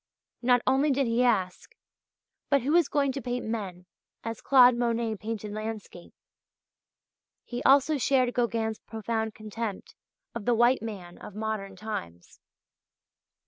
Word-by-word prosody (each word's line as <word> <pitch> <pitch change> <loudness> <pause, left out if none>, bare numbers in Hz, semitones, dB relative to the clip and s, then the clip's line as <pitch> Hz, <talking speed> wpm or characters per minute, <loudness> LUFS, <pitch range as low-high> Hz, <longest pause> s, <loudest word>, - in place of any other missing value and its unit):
Not 245 0 +3
only 270 +3 +3
did 275 0 +2
he 235 +1 +2
ask: 195 -7 0 0.7
"But 280 -3 +3
who 290 +4 +1
is 340 -3 +4
going 280 -3 +1
to 275 +1 -5
paint 245 0 -3
men 195 -5 -4 0.4
as 225 -1 -5
Claude 250 -2 +6
Monet 235 -2 0
painted 215 0 -5
landscape?" 215 -4 -7 1.4
(page - - -29
103); 240 - -3
he - - -6
also 280 +3 +5
shared 255 -1 +2
Gauguin's 225 -2 -1
profound 220 0 -3
contempt 215 -1 -6 0.4
of 230 -3 -6
the 240 - +3
white 240 +3 +4
man 195 -6 -7
of 205 - -10
modern 215 -3 -4
times. 90 - -7
230 Hz, 140 wpm, -28 LUFS, 215-250 Hz, 1.4 s, Claude